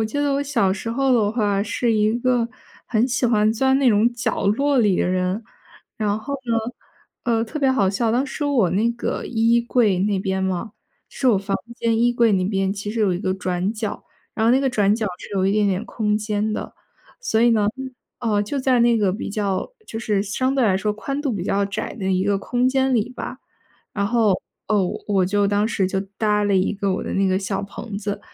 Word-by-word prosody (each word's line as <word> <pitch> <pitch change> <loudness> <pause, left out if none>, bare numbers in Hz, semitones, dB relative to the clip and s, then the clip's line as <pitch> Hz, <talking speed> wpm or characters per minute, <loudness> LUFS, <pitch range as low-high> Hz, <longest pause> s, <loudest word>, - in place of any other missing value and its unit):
我 - - +2
记 220 +7 -3
得 285 -1 +1
我 280 - 0
小 235 -10 +1
时 205 +4 -4
候 270 +2 +1
的 215 -4 +3
话 205 -4 +1
是 230 +2 0
一 215 0 +2
个 245 -1 +1 0.4
很 230 +1 +2
喜 250 0 0
欢 215 -2 +3
钻 265 +4 +2
那 270 -3 +4
种 220 +3 +3
角 230 -4 -2
落 275 +6 +2
里 205 -5 +3
的 - - +1
人。 185 +4 -1 0.5
然 210 -1 0
后 280 +6 -5
呢， 235 -2 0 0.7
呃， 230 -2 +1
特 270 +7 -6
别 270 -2 +3
好 200 -7 +2
笑， 220 +3 0
当 250 +4 +1
时 290 +2 -4
我 250 -11 +2
那 220 +5 +2
个 235 - -3
衣 230 0 +2
柜 230 -5 +2
那 200 0 +1
边 190 0 -1
嘛， 190 +3 -2 0.4
是 260 - 0
我 205 -5 +4
房 195 0 -2 0.2
间 230 -1 +1
衣 240 +1 +3
柜 235 -2 +3
那 185 -2 +2
边 195 0 0
其 205 +1 -5
实 225 +1 -3
有 200 -3 +3
一 - - -3
个 185 -1 -1
转 185 +1 -2
角， 215 -2 -5 0.3
然 220 - 0
后 - - +5
那 255 - +5
个 270 - +1
转 205 -2 +2
角 220 -1 -2
是 - - -10
有 190 -1 +1
一 195 - +2
点 210 0 +2
点 195 +2 -1
空 210 -2 -1
间 215 0 -1
的。 215 - -5 0.5
所 225 - 0
以 240 +1 +5
呢， 215 -3 +3 0.5
呃， 215 -4 +1
就 245 +8 -3
在 255 -2 +2
那 235 0 +4
个 200 -3 +2
比 200 - -5
较 200 - -2
就 225 - -6
是 210 -3 0
相 255 +6 -1
对 265 -3 +2
来 195 -4 +3
说 210 +2 -1
宽 275 +7 -4
度 280 -4 0
比 190 -5 -3
较 200 +1 +1
窄 195 0 -4
的 190 -3 -5
一 185 0 +1
个 200 0 +2
空 245 +4 0
间 265 0 +1
里 225 -3 +1
吧， 250 - -7 0.5
然 200 - -1
后， 225 0 +2 0.4
哦， 210 -3 +2
我 180 - -5
我 195 -3 +2
就 205 +1 +2
当 205 +1 +1
时 200 -4 0
就 190 +1 -1 0.2
搭 210 -1 +2
了 205 -1 +2
一 185 - +1
个 200 -1 -1
我 185 - -2
的 - - -4
那 195 0 +2
个 185 0 +2
小 195 0 -3
棚 200 +1 -7
子。 205 0 -4
215 Hz, 250 characters per minute, -22 LUFS, 200-240 Hz, 0.7 s, 后